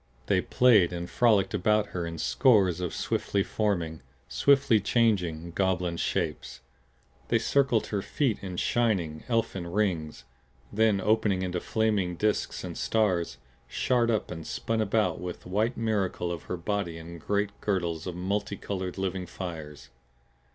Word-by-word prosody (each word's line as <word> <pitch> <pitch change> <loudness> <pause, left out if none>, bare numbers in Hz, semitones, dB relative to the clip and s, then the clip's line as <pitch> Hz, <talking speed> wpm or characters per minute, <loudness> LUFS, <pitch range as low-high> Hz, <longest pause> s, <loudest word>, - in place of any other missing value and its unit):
They - - +2
played 110 -9 +4
and 85 0 -4
frolicked 110 -2 +3
about 105 +3 +2
her 85 -2 -3
in 85 0 -6
scores 100 - +3
of 90 - -2
swiftly 100 -1 -1
forming, 85 -8 -1 0.3
swiftly 120 - +4
changing, 95 -7 +1
goblin 90 -2 0
shapes. 80 -3 -2 0.7
They - - +3
circled 135 -5 +2
her 100 - +1
feet 130 +1 0
in 90 -2 -6
shining, 95 -12 0
elfin 115 -7 -1
rings; 85 - -1 0.5
then 110 -1 +3
opening 105 -3 +2
into 90 -1 -2
flaming 105 -4 0
disks 105 +4 -1
and - - -6
stars, 90 - 0 0.3
shot 120 - +1
up 110 -5 0
and 80 -3 -7
spun 115 -1 -1
about 110 +1 +1 0.2
the - - -12
white 110 +6 0
miracle 100 -6 -1
of 85 -4 -6
her 90 - -3
body 85 -2 -2
in 85 +1 -9
great 100 +5 0
girdles 85 -4 -1
of 90 - -4
multi 100 +2 -2
colored 95 -2 -4
living 95 -1 -2
fires. 80 -6 -7
95 Hz, 145 wpm, -28 LUFS, 85-110 Hz, 0.7 s, played